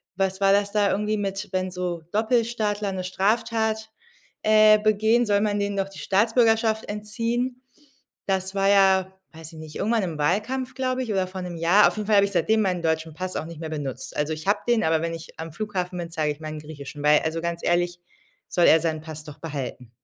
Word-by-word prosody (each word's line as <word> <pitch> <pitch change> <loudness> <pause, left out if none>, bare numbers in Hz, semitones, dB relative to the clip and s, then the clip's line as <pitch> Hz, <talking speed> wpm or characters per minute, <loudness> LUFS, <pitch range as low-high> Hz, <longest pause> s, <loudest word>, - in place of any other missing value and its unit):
was 190 0 -1
war 195 0 +4
das 200 0 +2
da 205 -1 +2
irgendwie 210 +1 0
mit 195 0 -3
„Wenn 185 -1 -1
so 180 -2 -3
Doppelstaatler 220 -2 0
'ne 185 -1 -4
Straftat, 220 +3 0 0.5
äh, 215 0 +6
begehen, 220 +3 +3
soll 205 -2 +2
man 205 -1 0
denen 200 0 -2
doch 195 0 -1
die - - -11
Staatsbürgerschaft 225 +1 +2
entziehen?“ 235 +4 -2 0.6
Das 190 0 -1
war 195 0 +2
ja- 190 -1 +4 0.2
weiß 160 0 -10
ich 160 - -10
nicht- 155 -1 -10
irgendwann 220 +3 +1
im 170 -4 -4
Wahlkampf, 225 - -1
glaube 260 -1 -1
ich, 230 - -4
oder 190 -2 0
vor 185 0 -7
'nem 175 -1 -6
Jahr. 175 +6 +5
Auf - - -2
jeden 210 -1 -3
Fall 215 - +3
habe 200 - +6
ich 200 - -4
seitdem 200 +5 +2
meinen 185 -4 0
deutschen 160 -1 -1
Pass 185 +3 -5
auch - - -3
nicht 165 -1 -9
mehr 160 -1 -5
benutzt. 140 -4 -5
Also, 150 +1 0
ich 155 +3 -8
habe 200 - +3
den, 240 -2 +3
aber 160 0 +2
wenn 165 0 -2
ich 165 -1 -10
am 165 0 -6
Flughafen 185 -3 -3
bin, 170 - -5
zeige 155 -2 0
ich 145 - -19
meinen 155 -1 -6
griechischen, 150 -1 -9
weil, 150 0 +6
also 160 +1 -2
ganz 170 0 -3
ehrlich, 175 0 +1 0.5
soll 175 - +3
er 160 - +7
seinen 160 -1 -2
Pass 155 -1 -8
doch 150 -2 -11
behalten. 135 -6 -6
190 Hz, 215 wpm, -24 LUFS, 165-215 Hz, 0.6 s, er